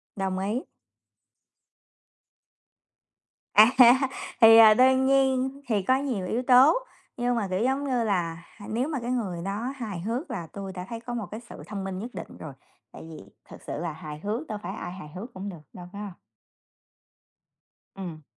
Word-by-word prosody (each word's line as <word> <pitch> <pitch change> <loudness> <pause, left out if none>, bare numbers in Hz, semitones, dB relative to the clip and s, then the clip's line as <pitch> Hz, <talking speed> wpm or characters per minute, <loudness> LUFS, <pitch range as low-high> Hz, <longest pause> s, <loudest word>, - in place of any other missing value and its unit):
Đồng 190 -1 -2
ý. 210 +7 -2 2.9
À, 220 +3 +8 0.7
thì, 225 0 +9
à, 220 -1 +9
đương 260 +2 +4
nhiên 265 0 +2
thì 210 -4 +1
có 260 +6 +3
nhiều 255 -9 -2
yếu 245 +3 -1
tố, 255 +4 +7 0.4
nhưng 245 0 0
mà, 210 -4 -1
kiểu, 185 +4 -1
giống 265 +2 0
như 250 -4 0
là, 170 -5 -1
hà 205 - -14
nếu 245 +6 -1
mà 285 -5 -2
cái 240 +1 -3
người 190 -9 -2
đó 225 +7 -3
hài 215 -9 -5
hước 235 - -3
là 170 -4 -5
tôi 195 -1 -6
đã 180 0 -6
thấy 230 -1 -5
có 240 +1 -7
một 225 -4 -3
cái 215 - -6
sự - - -10
thông 200 -2 -5
minh 190 -1 -4
nhất 235 +4 -6
định 170 - -8
rồi, 155 -3 -8 0.4
tại - - -11
vì 160 - -9 0.3
thực - - -12
sự - - -6
là 165 0 -3
hài 150 -1 -9
hước 220 - -4
đâu 215 - -4
phải 190 +4 -5
ai 175 - -6
hài 180 -5 -10
hước 230 +6 -8
cũng 195 +2 -6
được 170 -5 -10
đâu, 180 -1 -10
phải 205 - -7
hông? 200 -4 -7 1.8
Ừm. 170 -6 -8
215 Hz, 185 wpm, -26 LUFS, 185-250 Hz, 2.9 s, thì